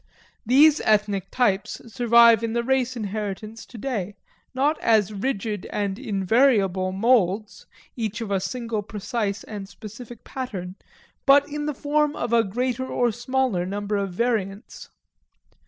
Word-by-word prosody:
These 295 +5 +6
ethnic 205 -3 +1
types 210 -5 0
survive 235 -2 +6
in 225 -1 -2
the 235 0 0
race 255 0 0
inheritance 215 +1 -5
today, 215 -5 -4 0.4
not 280 +4 +1
as 215 -2 +2
rigid 205 -2 -3
and 200 -1 -3
invariable 195 -2 +2
moulds, 210 -1 +1 0.3
each 220 -3 -3
of 225 -3 -5
a 195 - +2
single 230 +2 -3
precise 210 0 -3
and 200 -3 -8
specific 220 +3 -11
pattern, 195 -9 -6 0.5
but 285 +1 +6
in 295 0 -4
the 300 - -2
form 295 +1 0
of 235 - -3
a 230 -1 +5
greater 250 +5 -2
or 245 -2 +1
smaller 240 -4 -1
number 205 +3 -3
of 200 -2 -1
variants. 210 -1 -3
220 Hz, 135 wpm, -24 LUFS, 200-250 Hz, 0.5 s, These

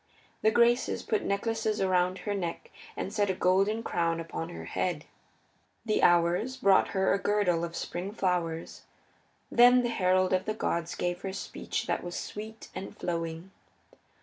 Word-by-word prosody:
The 220 - +5
Graces 235 +2 +2
put 435 -3 0
necklaces 220 +2 -1
around 185 -1 +2
her 205 - 0
neck 175 -4 -4 0.3
and 195 - -4
set 205 -2 +1
a 190 - 0
golden 195 +5 +2
crown 165 -4 0
upon 165 0 -5
her 175 - -8
head. 170 -5 -2 0.8
The 215 - +1
Hours 175 +9 +3
brought 195 0 +4
her 190 -1 +1
a 200 - +1
girdle 195 -5 +1
of 170 0 -4
spring 180 +3 -4
flowers. 175 -5 -2 0.7
Then 245 +1 +6
the 240 - 0
herald 185 -3 +2
of 185 - +1
the 215 - -2
gods 170 -5 -2
gave 175 0 -2
her 190 - -4
speech 195 - -4
that - - -1
was 175 0 -6
sweet 220 +2 -7
and 195 - -7
flowing. 165 +1 -4
190 Hz, 160 wpm, -29 LUFS, 175-215 Hz, 0.8 s, Then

